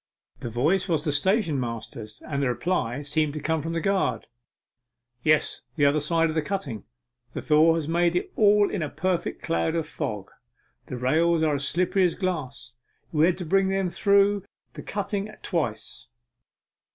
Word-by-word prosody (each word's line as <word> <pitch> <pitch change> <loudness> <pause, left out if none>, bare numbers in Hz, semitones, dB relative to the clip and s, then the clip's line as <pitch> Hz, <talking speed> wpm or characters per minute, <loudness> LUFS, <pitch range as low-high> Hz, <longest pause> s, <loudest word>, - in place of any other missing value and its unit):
The 120 - -5
voice 160 - +1
was 160 -3 +1
the 155 - 0
stationmaster's, 130 - -1
and 140 -2 -2
the 135 - +1
reply 130 -2 -1
seemed 150 +1 0
to - - -3
come 160 +1 -1
from 165 +2 -4
the 165 - 0
guard. 195 +3 0 1.0
'Yes, 155 +2 +2
the 145 -3 +3
other 145 +2 +3
side 165 +2 +2
of 155 - -3
the 160 - +1
cutting. 150 - -4 0.5
The - - -4
thaw 160 +2 +5
has 160 -3 -2
made 170 +1 +2
it 180 - -2
all 205 -1 +4
in 195 - -2
a 155 - -2
perfect 185 -2 -2
cloud 165 0 0
of 165 -2 -1
fog, 110 -12 -5
and 120 0 -35
the 125 - -5
rails 160 +6 +2
are 155 -2 +2
as 140 -1 0
slippery 185 +3 +2
as 175 - +2
glass. 150 -10 -4 0.4
We 155 +1 +4
had 180 - +1
to 180 - -5
bring 195 +4 +2
them 190 -2 0
through 200 0 +3 0.3
the - - -8
cutting 205 0 -3
at 215 - -15
twice. 115 - -3
160 Hz, 180 wpm, -25 LUFS, 140-185 Hz, 1.0 s, thaw